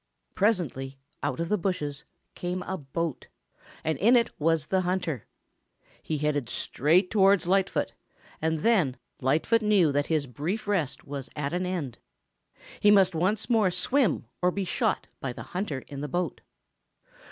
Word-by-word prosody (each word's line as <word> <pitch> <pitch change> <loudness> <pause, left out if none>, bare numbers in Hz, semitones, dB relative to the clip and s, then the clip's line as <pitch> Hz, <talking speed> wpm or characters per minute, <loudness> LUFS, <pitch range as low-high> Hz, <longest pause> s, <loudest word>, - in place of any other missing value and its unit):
Presently 160 - 0 0.2
out 140 -1 -2
of 170 - -1
the 210 - +2
bushes 150 -7 -2 0.3
came 180 +1 -3
a 190 - -3
boat, 160 -1 -4 0.6
and 160 -3 -1
in 235 +5 +5
it 235 -1 +3
was 160 0 +2
the 190 +3 +1
hunter. 180 - -2 0.7
He 155 - -2
headed 145 -4 -1
straight 165 +9 +2
towards 195 -3 +4
Lightfoot, 190 +2 +1 0.5
and 160 0 0
then 175 - +3 0.2
Lightfoot 155 - +2
knew 205 -7 +4
that 145 +1 0
his 155 -3 +1
brief 155 - -4
rest 185 -10 -1
was 140 -2 -6
at 145 0 -2
an 180 +1 -1
end. 160 -10 -3 0.8
He 210 - +5
must 195 -3 +6
once 190 +6 0
more 225 -5 +3
swim 190 - +1 0.2
or 180 - +4
be 195 +1 -2
shot 175 - 0
by 130 -2 -3
the - - -8
hunter 175 -8 -2
in 140 -1 -7
the 150 - -3
boat. 175 0 -2
170 Hz, 155 wpm, -27 LUFS, 145-195 Hz, 0.8 s, must